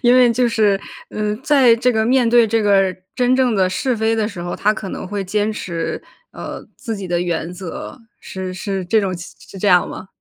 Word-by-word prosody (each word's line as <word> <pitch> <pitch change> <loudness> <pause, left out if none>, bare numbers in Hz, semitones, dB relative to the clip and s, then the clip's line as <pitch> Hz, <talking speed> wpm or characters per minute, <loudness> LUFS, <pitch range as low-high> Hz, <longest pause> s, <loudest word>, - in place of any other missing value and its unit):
因 245 0 +5
为 245 -2 +6
就 240 +1 +2
是， 210 -4 +2 0.3
呃， 210 0 -2
在 265 -6 +5
这 245 +2 +2
个 220 -2 +1
面 250 -1 +3
对 235 0 +5
这 220 0 +1
个 195 -2 +3 0.2
真 250 0 +3
正 255 -4 +2
的 185 -1 +3
是 250 +6 -1
非 220 +1 +1
的 220 -2 0
时 195 -5 -8
候， 175 0 -4
他 210 +1 +2
可 195 -3 -6
能 - - -6
会 200 0 -3
坚 210 +3 0
持， 170 -5 -4 0.3
呃， - - -7
自 225 -5 -5
己 195 -2 -6
的 175 0 0
原 175 -1 -2
则， 180 +7 -8 0.2
是 185 -1 -6
是 190 0 -3
这 215 +5 +2
种 195 -2 -1
是 180 +2 -11
这 205 - -1
样 180 -2 +4
吗？ 190 - -8
210 Hz, 235 characters per minute, -19 LUFS, 185-230 Hz, 0.3 s, 为